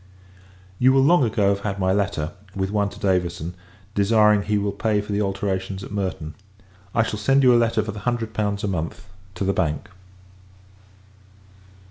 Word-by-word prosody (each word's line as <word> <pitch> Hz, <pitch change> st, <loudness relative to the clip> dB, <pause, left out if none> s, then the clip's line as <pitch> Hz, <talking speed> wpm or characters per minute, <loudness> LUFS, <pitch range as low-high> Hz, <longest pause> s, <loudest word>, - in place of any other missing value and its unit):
You 130 Hz, +1 st, +5 dB
will 135 Hz, 0 st, +4 dB
long 170 Hz, +1 st, +5 dB
ago 105 Hz, -4 st, +2 dB
have 100 Hz, 0 st, +1 dB
had 100 Hz, -1 st, -3 dB
my 95 Hz, -1 st, +1 dB
letter; 95 Hz, -6 st, -1 dB, 0.2 s
with 95 Hz, 0 st, -2 dB
one 105 Hz, -1 st, +1 dB
to 105 Hz, -, -13 dB
Davison, 90 Hz, -3 st, -1 dB, 0.4 s
desiring 105 Hz, 0 st, +4 dB
he 105 Hz, +1 st, 0 dB
will 100 Hz, 0 st, 0 dB
pay 105 Hz, +1 st, 0 dB
for 105 Hz, +1 st, -5 dB
the 100 Hz, +1 st, 0 dB
alterations 95 Hz, -1 st, -2 dB
at -, -, -9 dB
Merton. 95 Hz, -6 st, -3 dB, 0.6 s
I 115 Hz, -, +4 dB
shall 110 Hz, -1 st, -4 dB
send 135 Hz, +5 st, +3 dB
you 125 Hz, -1 st, +7 dB
a 120 Hz, 0 st, +5 dB
letter 115 Hz, -1 st, +1 dB
for 110 Hz, -, -4 dB
the 105 Hz, -, -8 dB
hundred 115 Hz, -1 st, -2 dB
pounds 105 Hz, -2 st, -1 dB
a -, -, 0 dB
month, 90 Hz, +1 st, -4 dB, 0.3 s
to 90 Hz, -, -3 dB
the 95 Hz, +1 st, +1 dB
Bank. 75 Hz, -4 st, -1 dB
100 Hz, 180 wpm, -23 LUFS, 95-110 Hz, 0.6 s, you